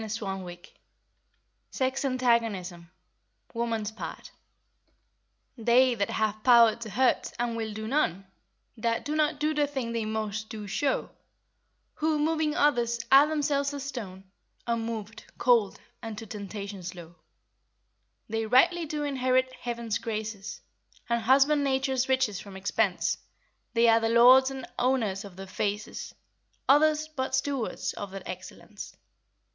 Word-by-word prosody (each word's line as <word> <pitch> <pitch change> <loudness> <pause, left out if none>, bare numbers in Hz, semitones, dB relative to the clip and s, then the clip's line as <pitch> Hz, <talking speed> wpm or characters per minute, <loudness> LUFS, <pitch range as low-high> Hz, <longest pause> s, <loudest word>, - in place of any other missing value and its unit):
CHAPTER 195 -5 -5
XV 175 +1 -19 1.0
SEX 265 +1 -1
ANTAGONISM 225 -9 0 0.6
(2) 230 - -6
WOMAN'S 225 -2 -1
PART 220 - -8 1.2
"They 245 +2 +4
that 200 -4 -1
have 215 0 -1
power 235 -3 +7
to 230 -1 -8
hurt, 255 +5 +1
and 240 -1 -1
will 220 -1 -3
do 215 +1 -6
none, 195 - 0 0.5
That 230 0 -1
do 300 - -2
not 300 -1 +1
do 305 +1 +1
the 295 -1 +1
thing 265 -5 -4
they 230 -1 -2
most 215 0 -3
do 215 -2 -7
show, 270 +7 -1 0.8
Who, 310 0 0
moving 310 0 0
others, 240 -5 +2
are 275 +2 +8
themselves 290 -2 0
as 280 - -5
stone, 205 -9 -7 0.4
Unmovèd, 225 -2 -3 0.2
cold, 235 -5 +3 0.2
and 225 -3 -6
to 225 - -7
temptation 200 -1 -7
slow,— 175 -2 -8 1.1
They 225 0 -2
rightly 320 +8 +4
do 300 0 -3
inherit 255 -2 +1
Heaven's 235 -3 -3
graces, 215 -2 -5 0.5
And 235 0 +1
husband 275 +5 +4
nature's 265 -1 0
riches 255 -7 +1
from 195 -2 -10
expense; 200 0 0 0.6
They 230 0 +5
are 225 0 +6
the 225 0 0
lords 250 +3 +7
and 265 -1 -6
owners 230 -6 +1
of 200 -3 -11
their 195 +1 -8
faces, 205 +2 -4 0.5
Others, 305 +2 +4
but 260 -3 -2
stewards 265 -2 -2
of 205 - -6
their 195 0 -8
excellence." 185 0 -9
235 Hz, 135 wpm, -28 LUFS, 210-265 Hz, 1.2 s, are